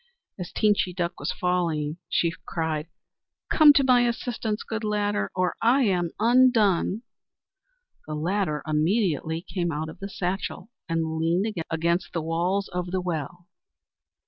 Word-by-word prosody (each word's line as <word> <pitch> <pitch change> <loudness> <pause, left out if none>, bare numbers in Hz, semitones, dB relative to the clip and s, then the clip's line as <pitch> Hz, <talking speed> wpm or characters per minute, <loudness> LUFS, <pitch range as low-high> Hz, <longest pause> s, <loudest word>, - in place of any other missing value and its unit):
As 180 - -5
Teenchy 205 -4 +1
Duck 175 -2 -2
was - - -2
falling, 165 -4 -1
she 170 -1 +1
cried: 160 -2 -2 0.6
"Come 310 -2 +8
to 280 - +4
my 250 -2 +4
assistance, 230 -2 -2
good 220 0 -4
Ladder, 205 -1 0
or 185 -1 0
I 250 +4 +4
am 180 -6 +1
undone." 225 -4 +3 1.0
The 155 - -4
Ladder 165 -1 -1
immediately 160 - 0
came 175 -3 -2
out 155 +1 -3
of - - -11
the 195 - -6
satchel, 190 +3 -4 0.2
and 160 -1 -1
leaned 170 +5 +1 0.2
against 170 +2 0
the 165 - -1
walls 175 +5 0
of 180 0 -3
the 185 +1 -1
well. 175 0 -4
180 Hz, 140 wpm, -25 LUFS, 165-210 Hz, 1.0 s, Come